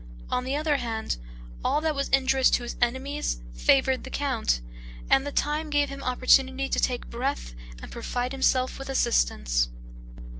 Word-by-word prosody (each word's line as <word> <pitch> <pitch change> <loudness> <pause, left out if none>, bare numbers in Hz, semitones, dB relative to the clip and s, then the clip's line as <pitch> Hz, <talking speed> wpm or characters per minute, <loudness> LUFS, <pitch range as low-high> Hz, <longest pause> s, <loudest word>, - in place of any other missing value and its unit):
On 250 - 0
the 265 +2 -1
other 300 -1 +1
hand, 225 - -3 0.5
all - - +2
that 315 -1 +1
was 275 -1 -2
injurious 265 0 +4
to 245 - +1
his 240 - -5
enemies 260 - -1
favored 135 - +3
the - - -8
count, 255 - 0 0.5
and 270 +1 +4
the - - -3
time 300 +2 -1
gave 290 -1 +2
him 275 0 -7
opportunity 260 +1 +3
to - - +1
take 245 -1 -1
breath 245 - -3 0.3
and - - -9
provide 245 +1 -3
himself 260 -1 +1
with 270 - -7
assistance. - - +1
265 Hz, 160 wpm, -26 LUFS, 240-275 Hz, 0.5 s, injurious